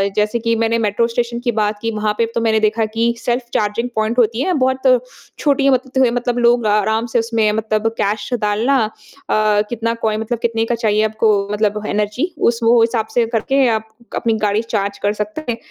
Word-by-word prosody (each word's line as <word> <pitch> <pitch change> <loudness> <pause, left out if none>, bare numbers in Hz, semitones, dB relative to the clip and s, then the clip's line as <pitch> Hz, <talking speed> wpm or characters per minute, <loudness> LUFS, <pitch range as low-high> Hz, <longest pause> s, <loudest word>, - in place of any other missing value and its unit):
जैसे 215 +2 +1
की 230 0 0
मैंने 230 0 +1
मेट्रो 210 +2 +1
स्टेशन 235 0 -2
की 240 0 -1
बात 210 0 +1
की 230 - -1
वहाँ 210 -1 -1
पे 230 - +2
तो 230 - +1
मैंने 220 -1 +2
देखा 220 +1 +1
की 230 +1 +1
सेल्फ 240 0 -2
चार्जिंग 215 +4 -1
पॉइंट 220 +2 0
होती 230 0 +2
है। 370 +5 +1
बहुत 260 -1 +3 0.4
छोटी 280 -2 +2
मत 260 -1 +1
त - - +4
है 240 - +1
मतलब 245 0 -1
लोग 240 -1 +3
अ, - - +2
आराम 220 +2 +1
से 240 - +3
उसमें 225 -2 +1
मतलब 215 0 -1
कैश 205 +1 -1
डालना 215 +6 +1
अ, 215 - -7 0.8
कितना 230 -1 -1
कॉइ 215 -1 +1
मतलब 225 +2 -3
कितने 225 -1 0
का 240 - -1
चाहिए 215 -2 +1
आपको 220 0 +1 0.2
मतलब 210 0 0
एनर्जी 210 - -1 0.2
उस 235 -1 -2
वो 230 +1 +5
हिसाब 225 -1 +1
से 240 -1 +3
करके 270 +4 +2
आप 220 0 -10 0.3
अपनी 230 - 0
गाड़ी 205 +2 +1
चार्ज 200 0 -1
कर 205 0 +2
सकते 210 +8 -5
हैं। 230 - -4
225 Hz, 210 wpm, -18 LUFS, 215-240 Hz, 0.8 s, वो